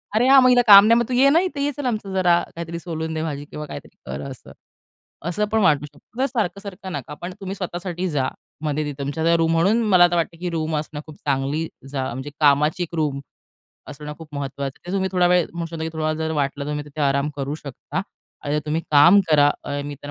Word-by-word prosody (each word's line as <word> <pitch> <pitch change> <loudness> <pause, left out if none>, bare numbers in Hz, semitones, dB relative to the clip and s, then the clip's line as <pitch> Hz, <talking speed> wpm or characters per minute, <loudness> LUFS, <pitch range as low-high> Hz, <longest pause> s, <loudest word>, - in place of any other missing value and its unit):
"अरे, 235 +4 +3
हां, 270 0 +8
मग 255 - +6
हिला 245 -1 +6
काम 200 0 +10
नाही. 230 +1 +5
मग 235 - 0
तू - - -2
ये 265 +3 +5
ना 315 +4 +5
इथे. 345 -7 -3
ये 290 - 0
चल 290 - -4
आमचं 215 -5 -2
जरा 175 -2 +3
काहीतरी 170 0 -5
सोलून 160 -2 -4
दे 160 - -2
भाजी 145 -2 -4
किंवा 150 +1 -7
काहीतरी - - -10
कर" 65 +2 -5
असं. - - -11 0.8
असं 210 +5 0
पण 220 - +2
वाटू 150 -5 +3
शकतं. 145 +10 -19
जर 265 - +3
सारखं-सारखं 200 -5 -4
नका, 145 0 -6
पण 175 +1 -5
तुम्ही 195 0 -5
स्वतःसाठी 180 -1 -4
जा 140 -5 0 0.4
मध्ये 155 0 -1
तिथं 145 -1 -5
तुमच्या 160 +4 +1
रूम. 165 0 +2
म्हणून 190 +8 +3
मला 180 -3 +6
आता 175 0 +4
वाटतंय, 170 0 -1
की 180 0 -3
रूम 160 -1 -2
असणं 150 0 -5
खूप 155 - -12
चांगली 140 +3 0 0.2
जा 135 -2 -2
म्हणजे 130 +4 -6
कामाची 150 +4 +3
एक 170 0 -7
रूम 150 -4 -1 0.7
असणं 150 +1 -7
खूप 160 -1 -11
महत्त्वाचं 140 -1 -5
आहे. - - -28
तिथे 180 - -5
तुम्ही 190 -1 0
थोडा 180 -1 +3
वेळ 180 -1 +3
म्हणू 170 0 -4
शकतो, 165 -1 -7
की - - -2
थोडा 160 -1 -2
वेळ 155 - 0
जर 160 0 -2
वाटलं 140 -1 -1
तर - - -6
तुम्ही 150 0 -3
तिथे 150 +1 -8
आराम 140 +1 +1
करू 140 +1 -3
शकता 140 -5 -6 0.4
आणि 145 +1 0
तुम्ही 155 +2 0
काम 150 +7 +7
करा. 145 -1 +5
अ, 145 0 -3
मी 145 0 -5
तर 145 - -7
160 Hz, 240 wpm, -22 LUFS, 145-185 Hz, 0.8 s, काम